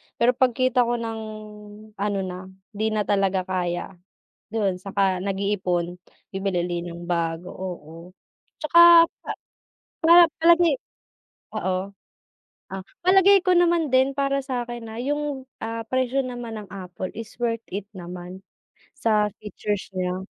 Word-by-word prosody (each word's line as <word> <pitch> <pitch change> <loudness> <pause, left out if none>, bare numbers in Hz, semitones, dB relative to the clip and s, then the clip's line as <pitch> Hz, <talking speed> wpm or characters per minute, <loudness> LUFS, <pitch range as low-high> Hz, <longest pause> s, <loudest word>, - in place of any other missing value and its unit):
pero 240 +1 +4
pagkita 255 0 +2
ko 240 - +1
ng 225 -1 -4 0.8
ano 200 0 0
na, 185 0 -6 0.3
'di 215 +1 -1
na 210 -1 +1
talaga 195 -2 +1
kaya 180 -1 -2 0.6
do'n, 205 -4 0
'saka 190 0 0
nag-iipon 190 -3 -1 0.4
bibili 195 -2 -1
uli 175 -1 -2
ng 170 0 -8
bago. 170 0 -1
Oo, 180 -5 -7 0.7
'tsaka 340 +1 +8 0.2
pa - - -4 0.7
para 340 +2 +9 0.2
palagi 340 +2 +5 0.8
oo. 185 +1 -2 0.8
Ah, 195 0 -4 0.2
palagay 385 +1 +6
ko 365 - +4
naman 345 -3 +3
din 260 +1 +4
para 275 0 +1
sakin 240 -3 -4
na 220 - -8
yung, 290 0 -2 0.2
ah, 225 0 -4
presyo 260 +1 +1
naman 245 -2 -6
ng 205 - -11
Apple 185 -1 -6
is 225 -1 -8
worth 230 -1 -1
it 200 +1 -4
naman 180 0 -8 0.6
sa 215 -6 +2
features 210 -1 -4
nya. 180 0 -1
210 Hz, 130 wpm, -24 LUFS, 185-260 Hz, 0.8 s, para